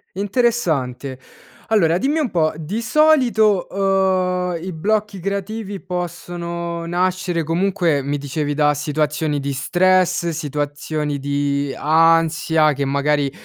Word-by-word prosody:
Interessante. 180 - -1 0.5
Allora, 175 -7 +3
dimmi 285 - 0
un 290 -6 0
po', 160 -4 +1
di 165 +9 -4
solito, 240 - +3
uhm, 185 -2 +1
i 185 - -4
blocchi 205 +4 -1
creativi 200 +2 -4
possono 170 -1 -5
nascere, 175 -1 -1
comunque, 165 -3 0
mi 145 +1 -2
dicevi 145 +1 -2
da 150 0 +2
situazioni 150 0 -1
di 140 0 -3
stress, 180 +4 +2
situazioni 150 -1 -3
di 140 0 -1
ansia, 160 0 +3
che 140 0 -2
magari, 140 0 +1
170 Hz, 110 wpm, -20 LUFS, 150-190 Hz, 0.5 s, Allora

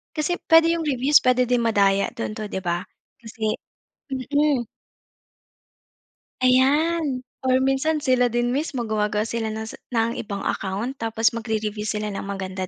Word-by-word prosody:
kasi 310 +3 0
puwede 330 0 +6
'yung 330 - -2
reviews 275 +2 +4
puwede 255 0 +4
din 245 -1 +2
madaya 200 -3 +3
do'n 230 -2 -4
'to 215 - -4
'di 190 - -2
ba, 175 +1 -1 0.4
kasi 220 -1 -3 0.6
mm. 280 0 +1 1.8
Ayan, 275 +2 +3 0.2
or 260 0 +3
minsan, 290 +3 +1
sila 255 -2 +3
din 240 +1 0
mismo 270 -3 -2
gumagawa 210 -1 0
sila 225 0 -3
ng 220 - -4
sa - - -12 0.2
ng 230 +1 +1
ibang 200 -2 -5
account 200 +6 -2
tapos 225 0 +1
mag-re-review 215 -2 -3
sila 210 0 -2
ng 195 - -5
maganda 190 -1 -4
235 Hz, 145 wpm, -23 LUFS, 215-270 Hz, 1.8 s, puwede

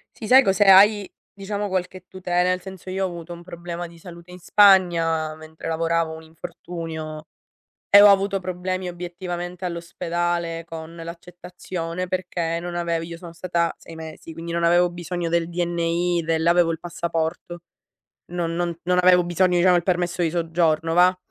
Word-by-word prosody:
Sì, 225 - -8
sai 260 +4 +8
cos'è, 195 0 +3
hai 200 +1 +6 0.2
diciamo 205 +1 -4
qualche 185 -1 -4
tutela. 180 -1 0
Nel 185 0 0
senso, 190 -1 -10
io 190 +1 -1
ho - - 0
avuto 170 -1 -8
un 170 0 -11
problema 175 0 -6
di 170 0 -16
salute 170 0 -12
in 180 - -11
Spagna, 170 -5 +4
mentre 155 0 -10
lavoravo 165 0 0
un 160 - -10
infortunio, 160 -1 -7 0.6
e 200 0 +9
ho 205 - +9
avuto 195 0 +3
problemi 185 0 -3
obiettivamente 175 +1 -6
all'ospedale 170 -1 -3
con 165 0 -9
l'accettazione, 175 +1 -6
perché 175 -2 -2
non 175 0 -6
avevo 170 -1 -1
io 170 0 -8
sono 170 -1 -10
stata 170 -1 -1
6 165 - -13
mesi, 160 0 -9
quindi 165 +1 -7
non 170 0 -1
avevo 175 +1 +4
bisogno 175 0 -4
del 170 0 +1
DNI 175 0 0
del 160 0 0
avevo 170 0 +4
il 160 - -4
passaporto. 170 0 -4 0.7
Non 170 -1 -3
non 170 -1 -2
non 180 +1 +2
avevo 180 -1 +5
bisogno, 175 +1 +2
diciamo 180 +1 +5
il 175 - +1
permesso 175 0 -1
di 165 - +1
soggiorno 165 -1 0
va, 180 +1 +5
175 Hz, 165 wpm, -23 LUFS, 165-180 Hz, 0.7 s, e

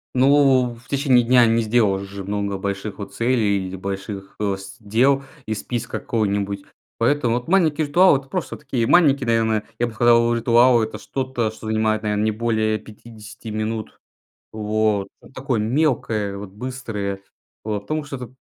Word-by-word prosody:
Ну, 135 -2 +4
в 115 - -16
в 125 - -22
течение 135 -3 +3
дня 125 0 +5
не 115 +1 +2
сделаешь 105 -4 +1
же 100 0 -8
много 100 0 -2
больших, 100 +1 -4
вот, 100 -1 -8
целей 105 -5 +1
или 95 - -6
больших, 95 +1 -6
э, 100 -2 0
с 100 +5 -11
дел 130 +6 +2 0.2
из 110 -1 -3
списка 120 -1 -4
какого-нибудь. 100 -3 -1 0.3
Поэтому, 120 -1 +1
вот, 125 - -4
маленькие 160 -4 +2
ритуалы- 175 -1 +5
это 135 - -16
просто 180 +3 -4
такие 130 -5 -2
маленькие, 140 -7 +4
наверное. 110 -2 +1
Я 120 - +1
бы 115 - -8
сказал, 120 +1 +4
ритуал- 120 +1 +4
это 110 - -5
что-то, 130 -4 -3
что 110 0 -10
занимает, 110 0 +1
наверно, 105 0 -1
не 110 - +2
более 110 -1 0
50 110 0 -12
минут. 110 0 -4 0.5
Вот, 105 -2 0
ну, - - -16
такое 130 -4 -2
мелкое, 110 -5 0
вот, 100 -1 -8
быстрое. 105 -4 -5 0.5
Вот, 105 -2 -2
потому 155 +8 -3
что 145 - -6
это 125 0 -9
115 Hz, 170 wpm, -22 LUFS, 105-125 Hz, 0.5 s, дня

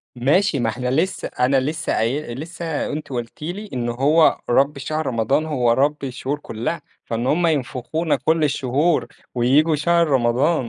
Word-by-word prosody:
ماشي 145 - +2
ما 115 -2 +1
إحنا 125 +2 -3
لسه 165 +8 0
أنا 130 +2 +1
لسه 155 +4 -2
قاي 120 +2 -1
لسه 160 +1 -4
أنتِ 150 0 -5
قُلتِ 120 -1 -6
لي 190 +7 -5
إن 120 -2 -2
هو 145 +7 +3
رب 140 +4 +3
شهر 155 +2 -3
رمضان 125 +6 +1
هو 125 -6 +1
رب 140 +3 +1
الشهور 135 +2 -3
كلها، 120 +4 -4 0.2
فإن 115 +2 -2
هُم 170 +5 +2
ينفخونا 150 +2 -1
كل 160 0 +1
الشهور، 145 +3 +1 0.3
وييجوا 140 +6 +3
شهر 170 +3 +2
رمضان 130 +3 +2
145 Hz, 155 wpm, -21 LUFS, 125-160 Hz, 0.3 s, هو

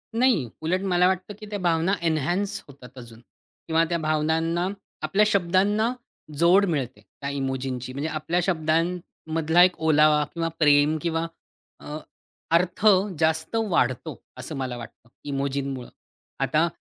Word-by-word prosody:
नाही. 230 - +3
उलट 180 +4 0
मला 180 0 +4
वाटतं, 185 +2 -2
की 215 - -9
त्या 205 - -4
भावना 170 +1 +1
एन्हान्स 170 +5 0
होतात 130 -3 -15
अजून 115 -2 -11 0.5
किंवा 165 0 +3
त्या 170 - +1
भावनांना, 160 +3 +1 0.3
आपल्या 195 +7 +2
शब्दांना 200 +4 +2 0.4
जोड 180 +5 +5
मिळते 135 -8 -3
त्या 140 - -8
इमोजीची 130 -2 -3
म्हणजे 145 +4 -3
आपल्या 160 +3 -1
शब्दांमधला 165 -1 +1
एक 180 -1 +3
ओलावा 150 -1 +4
किंवा 165 -1 -1
प्रेम 150 0 +4
किंवा 165 -1 -1 0.5
अ, 150 +1 -7 0.5
अर्थ 180 +5 +1 0.3
जास्त 160 +4 0
वाढतो 130 -2 0 0.2
असं 130 +5 -6
मला 130 -2 -3
वाटतं, 120 0 -12
इमोजींमुळं. 140 -2 -3 0.5
आता 155 +2 +2
160 Hz, 130 wpm, -25 LUFS, 140-175 Hz, 0.5 s, जोड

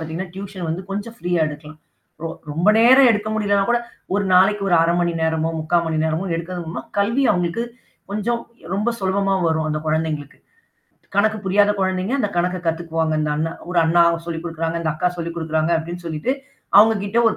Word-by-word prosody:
பாத்தீங்கன்னா, 165 +3 -5
டியூஷன் 190 -3 -6
வந்து 175 +4 -3
கொஞ்சம் 205 +4 -5
ஃப்ரீயா 175 -6 0
எடுக்கலாம். 150 +1 -10 0.4
ரொ 165 - -2 0.2
ரொம்ப 170 +7 +1
நேரம் 255 +3 +7
எடுக்க 210 0 0
முடியலன்னா 200 -2 +2
கூட, 240 - +3 0.4
1 205 -1 +1
நாளைக்கு 195 +3 +4
ஒரு 175 - +5
1/2 170 +1 +2
மணி 175 -1 +1
நேரமோ, 160 0 0
3/4 170 +2 +2
மணி 160 -1 -1
நேரமோ 160 +4 -1
எடுக்கறதன் 170 +1 -4
மூலமா, 160 - -5 0.2
கல்வி 230 +7 +2
அவுங்களுக்கு 180 +4 -1 0.5
கொஞ்சம் 235 +3 -1 0.3
ரொம்ப 215 +4 0
சுலபமா 195 +1 +1
வரும், 160 -1 0
அந்த 155 0 -2
கொழந்தைங்களுக்கு. 155 -2 -2 0.8
கணக்கு 215 +1 +3
புரியாத 205 +2 +3
கொழந்தைங்க 190 +4 0
அந்த 210 - +1
கணக்க 180 +1 0
கத்துக்குவாங்க. 165 -1 -1
இந்த 155 0 -1
அண்ணன் 165 +2 -2
"ஒரு 180 - +1
அண்ணா 170 +1 +4
ஒரு 170 - -6
சொல்லிக் 165 -1 -4
குடுக்குறாங்க, 165 0 -2
இந்த 160 -2 0
அக்கா 170 +3 +1
சொல்லிக் 170 -1 -4
குடுக்குறாங்க" 160 0 -1
அப்படின்னு 170 +2 -7
சொல்லிட்டு, 160 +10 -1 0.5
அவுங்ககிட்ட 210 0 +4
ஒரு 220 - -2
175 Hz, 180 wpm, -21 LUFS, 160-200 Hz, 0.8 s, நேரம்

